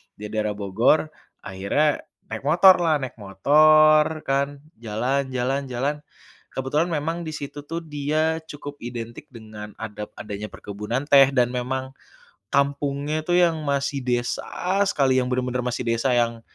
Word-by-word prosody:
Di 105 0 -8
daerah 105 -1 -1
Bogor, 110 +10 +2 0.3
akhirnya 100 +11 0 0.3
naik 110 +3 -5
motorlah, 175 -1 +6
naik 120 -3 -7
motor 155 +9 +4
kan, 140 +1 -1 0.2
jalan, 125 +5 -1
jalan, 135 +2 -1
jalan, 135 +4 -1 0.6
kebetulan 145 +6 0
memang 165 +1 -2
di 155 - -5
situ 145 0 -7
tuh 165 +1 -4
dia 155 +2 -1
cukup 145 0 -9
identik 120 +3 -7
dengan 110 -3 -10
ada 105 -1 -6
adanya 105 0 -6
perkebunan 105 +8 -5
teh, 135 -1 +7
dan 125 -1 +3
memang, 130 +1 -3 0.6
kampungnya 140 +2 0
itu 175 - -5
yang 165 -3 +3
masih 140 -1 -1
desa 125 +10 -1
sekali, 130 -7 +2
yang 125 - -3
benar-benar 125 0 -1
masih 125 0 -3
desa 115 +3 +1
yang 115 -1 +1
135 Hz, 140 wpm, -23 LUFS, 115-150 Hz, 0.6 s, teh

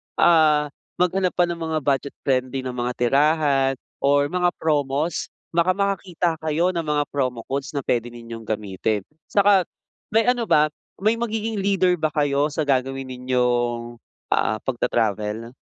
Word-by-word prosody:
ah, 155 -3 +4 0.2
maghanap 180 +1 +1
pa 175 - +4
ng 170 -1 -2
mga 160 0 0
budget-friendly 135 -1 -1
na 130 - -3
mga 125 0 -2
tirahan 140 +1 +2 0.3
or 140 +1 +3
mga 180 -1 +1
promos 150 +1 0 0.3
baka 170 +2 +2
makakita 185 -4 0
kayo 160 +4 +1
ng 170 - -1
mga 150 -2 0
promo 125 -5 -1
codes 140 +2 -4
na 140 - -3
pwede 120 0 0
ninyong 115 -1 -9
gamitin. 105 -1 -2 0.2
'Tsaka 200 -1 +5 0.5
may 225 +1 +3
ano 245 -2 +1
ba 150 0 +5 0.3
may 215 +3 +2
magiging 225 -2 -2
leader 190 -2 +2
ba 155 -3 0
kayo 145 0 +1
sa 150 +1 -2
gagawin 135 -1 0
ninyong, 120 -2 -1 0.3
ah, 110 - +1
pagta-travel? 110 -2 -1
145 Hz, 140 wpm, -23 LUFS, 125-175 Hz, 0.5 s, Tsaka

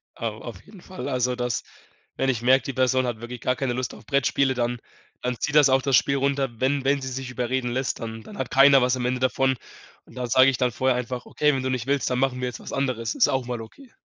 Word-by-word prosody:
Au - - -4
auf - - -9
jeden 195 -5 -15
Fall. 185 -6 -7
Also, 125 -1 0
das 125 -3 -2 0.5
wenn 135 - +1
ich 120 -3 0
merke, 130 +1 +4
die 135 - -3
Person 130 0 +2
hat 115 -2 -4
wirklich 120 0 -7
gar 125 - +1
keine 130 -2 -2
Lust 125 0 -3
auf - - -14
Brettspiele, 140 -1 +1
dann 120 -1 -2 0.4
dann 125 -1 -2
zieht 150 - -2
das 145 -2 +7
auch 130 0 +4
das 135 -1 +3
Spiel 140 +2 +3
runter, 140 0 0
wenn 135 +1 +1
wenn 140 0 +2
sie 130 - -5
sich 130 0 -5
überreden 125 +1 -2
lässt, 130 +1 -2
dann 115 -1 -6
dann 210 - -11
hat - - -4
keiner 135 -1 +7
was 125 +1 +2
am 125 - -3
Ende 125 +1 0
davon, 130 0 +1 0.5
und - - -18
da 125 -1 -3
sage 130 +3 +6
ich 130 - -1
dann 125 -1 +1
vorher 130 +2 +1
einfach: 125 0 -4
„Okay, 150 -1 +1
wenn 130 - -2
du 130 - -1
nicht 130 -1 -2
willst, 140 -1 +1
dann 125 - 0
machen 130 -1 0
wir 125 - -1
jetzt 125 - -6
was - - -9
anderes.” 130 - -1
Ist 275 - +4
auch 130 -2 0
mal 120 -2 -4
okay. 240 - -14
130 Hz, 265 wpm, -24 LUFS, 125-135 Hz, 0.5 s, das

